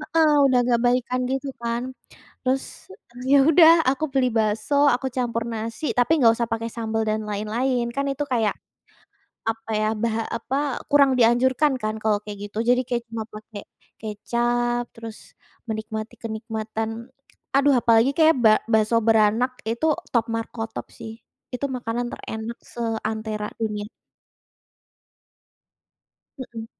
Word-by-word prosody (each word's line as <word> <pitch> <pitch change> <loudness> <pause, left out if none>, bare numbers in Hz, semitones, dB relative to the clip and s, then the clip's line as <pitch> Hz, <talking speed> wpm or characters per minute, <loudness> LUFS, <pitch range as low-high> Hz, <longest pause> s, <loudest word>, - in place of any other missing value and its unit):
heeh, 310 0 +2
udah 260 -2 +4
agak 240 -1 +2
baikan 250 +1 +1
gitu 270 +2 -2
kan. 235 0 -2 0.6
Terus, 260 +1 +1 0.7
ya 280 - +7
udah 325 0 +8 0.2
aku 275 +3 -1
beli 265 -2 +2
bakso 215 +4 0
aku 265 0 +1
campur 235 -2 -1
nasi 225 +5 -5
tapi 245 +5 +3
nggak 230 -3 +6
usah 235 -1 -1
pakai 230 0 -2
sambel 225 -1 -2
dan 215 0 0
lain-lain 235 +4 -1
kan 275 - 0
itu 275 +2 -3
kayak 220 -5 +1 1.0
apa 225 0 -5
ya 215 - +1
bah 230 -1 0 0.2
apa, 245 +3 -3 0.3
kurang 280 -2 +5
dianjurkan 255 +5 +3
kan 215 0 -2
kalau 215 -1 +2
kayak 210 -1 -7
gitu 205 - -10
jadi 250 +1 +4
kayak 240 -2 -1
cuma 225 -1 -4
pakai 215 -1 -9 0.4
kecap 240 +3 -1
terus 225 -1 -9 0.5
menikmati 220 0 -5
kenikmatan 220 0 -4 0.7
aduh, 280 +1 +5
apalagi 230 +3 +4
kayak 320 0 +5
bak 215 -1 +6
bakso 220 +1 +3
beranak 225 +3 +3 0.2
itu 235 +7 -1 0.3
top 235 -2 +3
markotop 225 0 -5
sih. 225 - -7 0.4
Itu 250 +3 -2
makanan 240 0 -3
terenak 220 +1 -6
seantera 220 -2 -3
dunia. 210 -2 -2 2.5
Hmm. 230 -3 -7
230 Hz, 130 wpm, -23 LUFS, 220-250 Hz, 2.5 s, udah